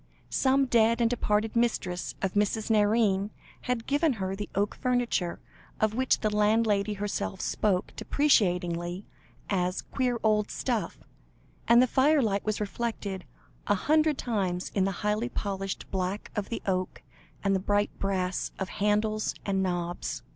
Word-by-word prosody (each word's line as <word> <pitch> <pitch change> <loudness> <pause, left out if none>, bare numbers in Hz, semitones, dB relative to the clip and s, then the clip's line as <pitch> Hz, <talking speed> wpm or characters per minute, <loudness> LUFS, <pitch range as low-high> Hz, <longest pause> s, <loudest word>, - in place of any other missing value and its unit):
Some 270 +1 +3
dead 230 -2 +3
and 235 - +4
departed 215 -2 0
mistress 210 -6 0
of 190 - 0
Mrs. 210 +2 0
Nairne, 210 -2 +3 0.4
had 250 -2 -1
given 290 +1 +2
her 190 -3 -3
the 205 0 -5
oak 205 +1 +1
furniture, 245 -8 0 0.4
of 215 -1 +2
which 260 +3 +1
the 215 -1 0
landlady 210 -1 +2
herself 200 - -3
spoke 195 -4 0
deprecatingly, 180 - +1 0.4
as 180 -2 0
"queer 250 -3 -1
old 210 -1 +2
stuff," 240 -5 -2 0.7
and 235 +1 +7
the - - +5
firelight 260 -6 +2
was 215 -1 -1
reflected 205 -3 -3 0.4
a 205 - +4
hundred 305 +7 +2
times 190 -6 -2
in 195 -2 +2
the 195 - 0
highly 210 +3 +1
polished 195 -4 -3
black 190 +2 -2
of 205 -2 -2
the 230 - -4
oak, 185 -1 -2 0.4
and 195 -1 +2
the - - +1
bright 205 +2 +1
brass 185 -2 -1
of 190 - -3
handles 210 +1 +1
and 195 -1 +1
knobs. 175 -2 -2
210 Hz, 145 wpm, -28 LUFS, 190-230 Hz, 0.7 s, and